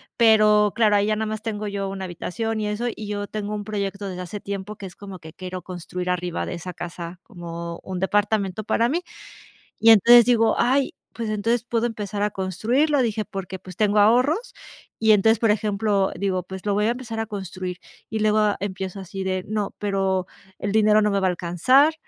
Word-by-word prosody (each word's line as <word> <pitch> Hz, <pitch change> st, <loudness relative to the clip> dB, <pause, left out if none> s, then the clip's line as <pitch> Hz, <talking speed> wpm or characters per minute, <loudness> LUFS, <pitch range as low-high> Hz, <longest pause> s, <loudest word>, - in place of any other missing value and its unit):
pero 215 Hz, -2 st, +5 dB
claro, 215 Hz, -3 st, +4 dB
ahí 205 Hz, 0 st, +3 dB
ya 215 Hz, -, +2 dB
nada 220 Hz, -, -2 dB
más 215 Hz, 0 st, -4 dB
tengo 215 Hz, -2 st, -4 dB
yo 200 Hz, -1 st, -3 dB
1 190 Hz, -1 st, -5 dB
habitación 220 Hz, +6 st, -3 dB
y 210 Hz, -, -1 dB
eso, 210 Hz, +4 st, -2 dB
y 215 Hz, -, -8 dB
yo 205 Hz, 0 st, -3 dB
tengo 210 Hz, 0 st, -4 dB
un 205 Hz, -, -4 dB
proyecto 200 Hz, -1 st, -3 dB
desde 180 Hz, 0 st, -6 dB
hace 180 Hz, +4 st, -6 dB
tiempo, 200 Hz, +1 st, -5 dB
que 200 Hz, -, -9 dB
es 180 Hz, -, -10 dB
como 195 Hz, -2 st, -9 dB
que 160 Hz, -1 st, -12 dB
quiero 185 Hz, 0 st, -6 dB
construir 180 Hz, 0 st, -5 dB
arriba 180 Hz, -1 st, -2 dB
de -, -, -5 dB
esa 180 Hz, +2 st, -7 dB
casa 175 Hz, 0 st, -7 dB
como 170 Hz, -4 st, -7 dB
un 185 Hz, -1 st, -5 dB
departamento 205 Hz, +1 st, 0 dB
para 230 Hz, +1 st, +2 dB
mí. 335 Hz, +6 st, 0 dB, 0.8 s
Y 225 Hz, -, +6 dB
entonces 235 Hz, +2 st, +8 dB
digo: 225 Hz, -2 st, +3 dB
"Ay, 265 Hz, +2 st, +2 dB, 0.2 s
pues, 225 Hz, -2 st, -4 dB
entonces 225 Hz, +3 st, 0 dB
puedo 235 Hz, -1 st, 0 dB
empezar 210 Hz, -3 st, -4 dB
a 210 Hz, -, +1 dB
construirlo". 240 Hz, -, +1 dB
Dije: 220 Hz, -2 st, -1 dB
"Porque, 190 Hz, -1 st, -6 dB
pues, 185 Hz, -1 st, -12 dB
tengo 210 Hz, -1 st, +2 dB
ahorros", 250 Hz, -, +3 dB, 0.5 s
y 220 Hz, -, +3 dB
entonces, 220 Hz, +2 st, +4 dB
por 225 Hz, -, +3 dB
ejemplo, 205 Hz, -1 st, +1 dB
digo: 185 Hz, 0 st, -1 dB
"Pues, 190 Hz, 0 st, -8 dB
lo 205 Hz, -, +2 dB
voy 210 Hz, +1 st, +2 dB
a 230 Hz, -, +3 dB
empezar 240 Hz, -2 st, -5 dB
a 225 Hz, -, -2 dB
construir", 185 Hz, -3 st, -5 dB, 0.3 s
y 220 Hz, -, -2 dB
luego 215 Hz, 0 st, +3 dB
ah, 210 Hz, -1 st, +2 dB
empiezo 190 Hz, 0 st, -4 dB
así 190 Hz, 0 st, -6 dB
de 185 Hz, -1 st, -2 dB
no, 210 Hz, -1 st, -2 dB
pero 195 Hz, -2 st, 0 dB, 0.3 s
el 205 Hz, -, -2 dB
dinero 215 Hz, 0 st, +5 dB
no 210 Hz, -, +2 dB
me 200 Hz, -, +1 dB
va 190 Hz, -, +2 dB
a 185 Hz, -, +3 dB
alcanzar, 190 Hz, -, +3 dB
205 Hz, 210 wpm, -23 LUFS, 190-220 Hz, 0.8 s, entonces